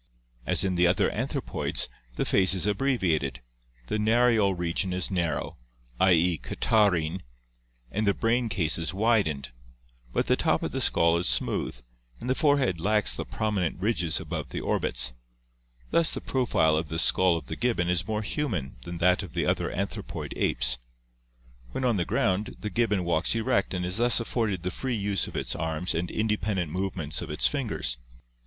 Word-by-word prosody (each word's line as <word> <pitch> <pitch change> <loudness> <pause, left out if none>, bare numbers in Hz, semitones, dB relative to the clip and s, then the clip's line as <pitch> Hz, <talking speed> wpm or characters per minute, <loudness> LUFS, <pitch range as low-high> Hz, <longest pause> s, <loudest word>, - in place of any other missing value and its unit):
As - - +3
in 95 -1 0
the 90 0 +4
other 90 +1 +2
anthropoids, 135 +4 -2 0.3
the - - -1
face 95 -1 +4
is 95 - 0
abbreviated, 95 - 0 0.5
the 105 - -2
narial 110 -3 +3
region 85 +2 -1
is 90 +2 -1
narrow, 85 -5 -2 0.2
*. - - -14
e., 85 -1 +3
catarrhine, 95 -6 +1 0.7
and 105 +4 -1
the 100 - +3
brain 115 +1 +1
case 85 -5 +1
is 85 +3 -3
widened, 100 - +1 0.6
but - - 0
the - - +3
top - - +1
of - - -2
the - - -2
skull 85 0 +4
is 85 - 0
smooth, - - 0 0.4
and 120 - -7
the 130 - +3
forehead 135 - +2
lacks 105 +2 +2
the - - -4
prominent 100 -6 -2
ridges 90 -5 +1
above - - -5
the - - -4
orbits; 60 0 0 0.8
thus 170 -1 +3
the - - -2
profile 120 - +1
of 80 -1 -2
the 80 - -3
skull 90 +1 +5
of 80 - -8
the - - -5
gibbon 115 -8 0
is 90 0 0
more 110 0 -1
human 100 - -3
than 85 0 -5
that 90 +2 +3
of 95 -7 -9
the - - 0
other - - 0
anthropoid - - -4
apes. 65 0 +1 0.9
When 130 - -2
on 120 -4 +2
the 85 - 0
ground 95 +5 0
the 105 - -4
gibbon 110 -5 +1
walks 85 +4 +1
erect 120 +2 +1
and 90 -1 -2
is 90 +3 -2
thus 120 +1 +3
afforded 110 -6 -2
the 90 - -2
free 130 +5 -3
use 100 -3 -1
of - - -7
its - - -2
arms 80 +2 -2
and 85 +2 -2
independent 105 -6 -1
movements 90 -4 -2
of - - -6
its 75 - -1
fingers. 110 - 0
95 Hz, 175 wpm, -27 LUFS, 85-110 Hz, 0.9 s, skull